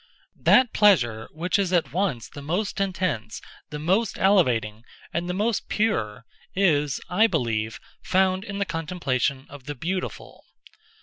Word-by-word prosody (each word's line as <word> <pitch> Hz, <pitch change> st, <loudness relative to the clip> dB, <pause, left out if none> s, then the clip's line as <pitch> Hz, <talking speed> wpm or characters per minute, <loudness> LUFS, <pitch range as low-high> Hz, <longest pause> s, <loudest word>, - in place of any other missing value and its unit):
That 255 Hz, -2 st, +5 dB
pleasure 120 Hz, -, +3 dB
which 180 Hz, +5 st, -1 dB
is 190 Hz, -3 st, 0 dB
at 175 Hz, -3 st, +1 dB
once 175 Hz, -, -1 dB
the 145 Hz, -, -10 dB
most 185 Hz, +8 st, -2 dB
intense, 185 Hz, -, -2 dB, 0.3 s
the 150 Hz, -, -5 dB
most 190 Hz, +9 st, 0 dB
elevating, 120 Hz, -, +2 dB, 0.3 s
and 170 Hz, +1 st, -2 dB
the -, -, -1 dB
most 215 Hz, +2 st, -1 dB
pure, 115 Hz, -, -1 dB, 0.3 s
is, 150 Hz, -7 st, +2 dB
I 215 Hz, +6 st, +4 dB
believe, 115 Hz, -, -1 dB, 0.2 s
found 185 Hz, 0 st, +1 dB
in 200 Hz, -2 st, -6 dB
the 200 Hz, -, 0 dB
contemplation 150 Hz, -6 st, -2 dB
of 140 Hz, -2 st, -12 dB
the 145 Hz, 0 st, -5 dB
beautiful. 180 Hz, +8 st, -5 dB
170 Hz, 140 wpm, -25 LUFS, 130-195 Hz, 0.3 s, That